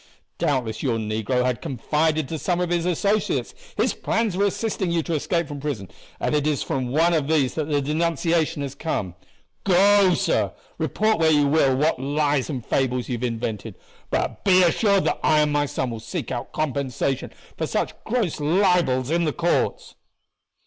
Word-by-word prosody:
Doubtless 120 -6 -1
your 120 -5 0
negro 110 +3 -1
had 125 -2 -1
confided 155 +1 0
to 160 +1 -4
some 175 +2 0
of 180 -1 -1
his 175 0 +1
associates 200 +4 0 0.2
his - - +2
plans 225 -3 -1
for 195 +3 0
assisting 200 -2 -1
you 170 -1 0
to 170 - -3
escape 170 +2 0
from 145 0 -6
prison, 135 - -4 0.3
and - - -1
it 150 0 +1
is 150 -3 0
from 130 -2 -2
one 165 +6 +3
of 155 -4 +1
these 150 -5 +2
that 155 -1 -3
the 145 -2 +1
denunciation 165 +1 0
has 140 -1 -5
come. 140 - -3 0.5
Go, 195 0 +5
sir, - - 0 0.3
report 215 -2 +1
where 160 -1 +4
you 150 -2 +4
will 140 -3 +3
what 150 0 +1
lies 145 0 0
and 130 -7 -4
fables 125 -1 0
you - - -1
have 120 - -7
invented; 115 -3 -3 0.3
but - - -2
be 185 -2 +5
assured 200 +3 +3
that - - 0
I 155 -1 +4
and 150 -1 +1
my 145 0 +1
son 130 -2 -2
will 115 - -5
seek 110 - -5
our 120 - -3
compensation 140 -3 -2 0.2
for - - -2
such - - -1
gross 220 -10 -1
libels 155 -5 +2
in 170 0 +2
the 150 - 0
courts." 170 0 -1
150 Hz, 185 wpm, -23 LUFS, 130-170 Hz, 0.5 s, Go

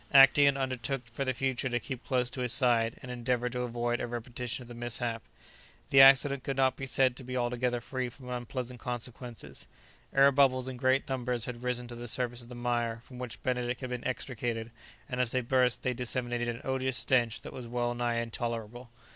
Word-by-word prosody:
Actæon 140 +1 +8
undertook 130 0 -2
for 130 +4 -2
the 130 - 0
future 130 0 -1
to 120 0 0
keep 130 +1 -6
close 125 -1 0
to 130 - -4
his 125 -2 +2
side, 120 -2 +4
and 125 - -6
endeavour 125 0 -1
to 125 +1 -4
avoid 120 0 -1
a - - -2
repetition 120 +1 -4
of - - -14
the 120 - -9
mishap. 120 -1 -3 0.7
The 135 - +8
accident 135 0 +7
could 135 0 -3
not 130 -1 +3
be 135 0 -5
said 130 -1 +3
to - - -7
be 125 +1 -4
altogether 120 0 0
free 130 +1 -3
from 125 +1 -14
unpleasant 125 0 -4
consequences. 120 - -6 0.4
Air 135 +1 +6
bubbles 130 -2 +3
in 130 -1 -5
great 130 +3 +2
numbers 125 -3 -1
had 120 -1 -6
risen 125 -1 -1
to - - -7
the 120 0 -7
surface 120 +1 0
of 120 - -13
the 125 - -8
mire 120 -1 -1
from 125 -2 -11
which 125 -2 -7
Benedict 125 0 -1
had 130 -1 -5
been 125 -1 -3
extricated, 120 -3 -3 0.4
and 125 0 -1
as 125 - +1
they 130 +1 +1
burst 125 0 +2
they 130 - +1
disseminated 120 -1 -2
an 120 0 -3
odious 130 -1 0
stench 120 -4 +2
that - - -9
was 125 -2 -7
well 120 0 -1
nigh 120 -1 -1
intolerable. 115 0 -4
125 Hz, 205 wpm, -30 LUFS, 120-130 Hz, 0.7 s, Actæon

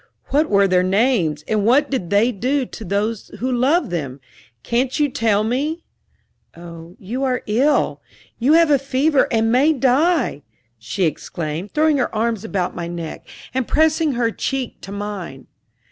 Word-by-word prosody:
What 300 +3 +2
were 200 -1 +4
their 180 -1 +3
names, 185 - +1
and 215 -2 0
what 270 +7 +3
did 190 -11 -2
they 210 +5 +3
do 255 +6 -1
to 225 - -10
those 205 +3 -2
who 255 +2 -2
loved 260 - +1
them 140 -6 -4 0.4
can't 250 +4 0
you 295 -1 +2
tell 225 -6 +1
me?" 290 +9 -2 0.7
"Oh, 170 0 -11
you 235 +8 -4
are 255 -2 -1
ill 265 +8 +1 0.4
you 260 +6 +3
have 330 -1 +5
a 280 - +4
fever 275 +2 +2
and 225 -1 +2
may 280 +6 +4
die!" 270 - +1 0.4
she 130 - -3
exclaimed, 165 +2 -3
throwing 305 -1 +3
her 245 - -1
arms 225 -1 -1
about 190 -5 -2
my 170 -1 -5
neck 170 -2 -7 0.3
and 260 -2 -1
pressing 315 -1 +2
her 235 -2 0
cheek 265 +1 -4
to 195 - -9
mine. 200 -9 -6
230 Hz, 160 wpm, -20 LUFS, 190-275 Hz, 0.7 s, have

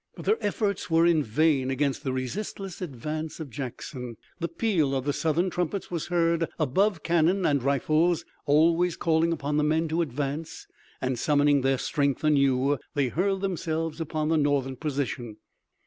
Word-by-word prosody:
But - - -9
their 435 - +1
efforts 205 -2 -1
were 165 +1 +4
vain 140 +1 +2
against 140 +1 -1
the 135 - -1
resistless 185 - -4
advance 155 +1 -5
of 150 -5 -7
Jackson. 125 -1 -6 0.2
The 170 - -1
peal 165 -11 0
of 130 -1 -2
the 145 - +1
Southern 165 +4 0
trumpets 180 +3 -2
was 170 -2 -3
heard 170 -1 +1
above 165 +4 +1
cannon 175 +3 +2
and 140 -2 +2
rifles, 155 +6 +1 0.2
always 165 +4 +3
calling 165 0 +2
upon 150 -2 -1
the 150 - +2
men 160 +2 +1
to 165 +2 +1
advance, 145 +2 -4 0.4
and, 130 -2 -1
summoning 145 0 +3
their 135 0 +2
strength 140 0 -1
anew, 140 -2 +3 0.2
they 140 -3 +1
hurled 190 +6 0
themselves 165 -4 -2
upon 155 -1 -2
the 160 - +3
Northern 140 -3 +1
position. 130 -6 -3
155 Hz, 160 wpm, -27 LUFS, 140-170 Hz, 0.4 s, were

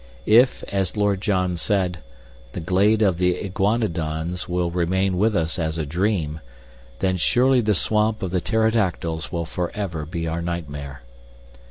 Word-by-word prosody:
If, 120 +4 +4
as 95 0 -1
Lord 100 -2 +1
John 90 -4 0
said, 90 -1 0 0.5
the - - -4
glade 100 +6 +2
of 95 -4 +2
the 90 -1 +2
iguanodons 90 -5 -1
will 90 -1 0
remain 90 +2 0
with 110 +1 +2
us 80 +1 -1
as 80 0 -2
a 80 - -2
dream, 85 -1 -1 0.6
then 95 -1 +1
surely 125 +8 +3
the 105 -2 +1
swamp 110 +3 +1
of 95 - -2
the 90 -1 0
pterodactyls 100 -7 0
will 85 -1 -2
forever 85 -2 -4
be 85 0 -4
our 80 +1 -2
nightmare. 70 -6 -5
90 Hz, 150 wpm, -23 LUFS, 85-105 Hz, 0.6 s, If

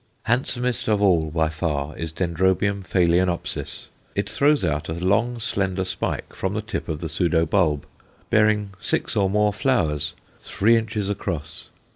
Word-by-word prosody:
Handsomest 125 0 0
of 105 -2 +3
all 85 -6 +3
by 80 0 +1
far 75 -2 -2
is 80 -1 -4
D. 90 +3 -1
phaloenopsis. 90 0 0 0.3
It - - -1
throws 145 -6 +3
out 75 -2 -1
a - - -1
long, 105 +7 +1
slender 95 -4 -1
spike 90 - -3
from - - -3
the - - -1
tip - - -4
of 80 0 -3
the 85 - -2
pseudo 80 +1 +1
bulb, 75 -5 +1 0.5
bearing 105 -2 +3
six - - -1
or 100 -2 +2
more 105 +1 +2
flowers, 80 - 0 0.2
three 115 +4 +2
inches 110 -3 -1
across. 80 -6 -4
95 Hz, 150 wpm, -23 LUFS, 80-105 Hz, 0.5 s, of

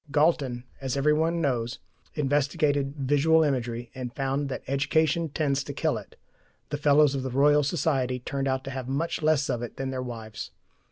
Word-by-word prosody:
Galton, 140 -4 +2 0.2
as 130 -1 -2
every 150 +2 +3
one 165 +2 +1
knows, 125 -4 -1 0.4
investigated 145 0 +1
visual 145 +4 +3
imagery, 120 -4 -2
and 125 -2 -5
found 135 +1 -1
that - - -5
education 155 +4 +1
tends 140 -2 0
to 140 - -6
kill - - 0
it: - - -9 0.5
the 145 - -2
Fellows 145 0 +4
of 135 - -1
the 130 - -3
Royal 145 +3 +4
Society 135 -4 0
turned 135 +2 -3
out 130 0 0
to 135 - -6
have 130 -2 -5
much 150 +6 -1
less 155 -2 +2
of 120 - -1
it 120 - -7
than 135 0 -3
their 130 -1 -3
wives. 115 -3 -6
140 Hz, 180 wpm, -27 LUFS, 130-150 Hz, 0.5 s, Fellows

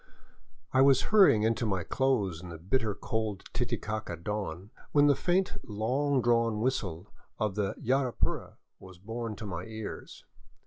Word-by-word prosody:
I 130 - +5
was 135 -1 +6
hurrying 190 - +7
into 115 +1 +1
my 95 -4 0
clothes 105 - 0
in 90 - -9
the 85 - -7
bitter 105 +5 0
cold 110 -3 -3
Titicaca 105 -4 -2
dawn, 95 +1 -5 0.2
when 145 -1 +6
the 145 -1 +5
faint 185 +5 +1
long 130 +6 0
drawn 115 -2 +2
whistle 105 -7 -2 0.2
of 105 -3 0
the 100 -1 -1
" - - -17
Yapura 130 0 -1
" - - -57
was 95 -1 -13
borne 115 +3 -5
to 110 - -8
my 90 -3 -5
ears. 110 -1 -8
110 Hz, 160 wpm, -30 LUFS, 95-130 Hz, 0.2 s, hurrying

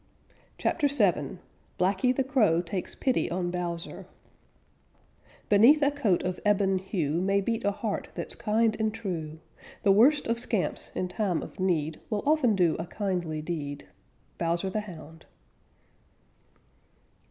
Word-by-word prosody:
CHAPTER 295 -3 +1
VII 195 - +2 0.4
BLACKY 190 +7 +2
THE 270 - 0
CROW 215 - +2
TAKES 180 +1 -5
PITY 260 -2 0
ON 175 0 -2
BOWSER 175 -1 -5 1.4
Beneath 240 +9 +6
a 285 - +4
coat 230 -11 +1
of 180 0 -3
ebon 200 -2 +2
hue 170 -4 -1
May 195 +1 +2
beat 225 +3 -2
a 205 - +3
heart 205 +1 -3
that's - - -3
kind 220 +1 +1
and 220 0 +1
true. 165 -8 -5 0.5
The 200 - +5
worst 265 +9 +5
of 230 0 0
scamps 225 -5 -2
in 185 - -1
time 180 -2 -1
of - - -11
need 160 -4 0
Will 210 -1 -1
often 285 -7 +3
do 175 -4 +3
a 165 - -4
kindly 175 -6 -3
deed. 145 - -5 0.5
_Bowser 170 +3 -1
the 215 - 0
Hound. 165 -5 -12
195 Hz, 140 wpm, -28 LUFS, 170-220 Hz, 1.4 s, Beneath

